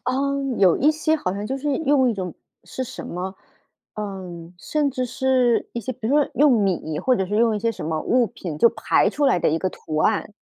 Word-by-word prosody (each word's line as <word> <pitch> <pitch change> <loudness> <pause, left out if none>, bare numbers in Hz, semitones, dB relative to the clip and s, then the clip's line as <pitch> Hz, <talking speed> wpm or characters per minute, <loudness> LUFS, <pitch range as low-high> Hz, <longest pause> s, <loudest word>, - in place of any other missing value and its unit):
嗯， 275 -1 -1
有 185 -4 +5
一 300 +3 +4
些 315 +1 +1
好 185 -11 -2
像 205 +1 -4
就 270 - -2
是 285 0 -1
用 275 -5 +3
一 - - -2
种 180 -4 -5 0.3
是 260 - -5
什 255 - -8
么， 185 +2 -5 0.6
呃， 195 -3 -5 0.3
甚 290 +8 -1
至 255 -1 -2
是 255 -2 +1
一 235 - -4
些， 255 +4 -4
比 230 -2 -6
如 280 - +2
说 295 - +2
用 290 -1 +5
米 185 -8 0
或 255 +7 +2
者 190 - 0
是 210 - -2
用 225 -1 +3
一 - - -2
些 230 +2 0
什 - - -7
么 160 -1 -1
物 245 +5 +2
品 170 -5 -7
就 235 - +6
排 - - +2
出 290 - -1
来 255 - +3
的 - - +1
一 160 - +1
个 185 - -1
图 155 -1 -5
案。 210 +4 +1
235 Hz, 250 characters per minute, -22 LUFS, 190-270 Hz, 0.6 s, 就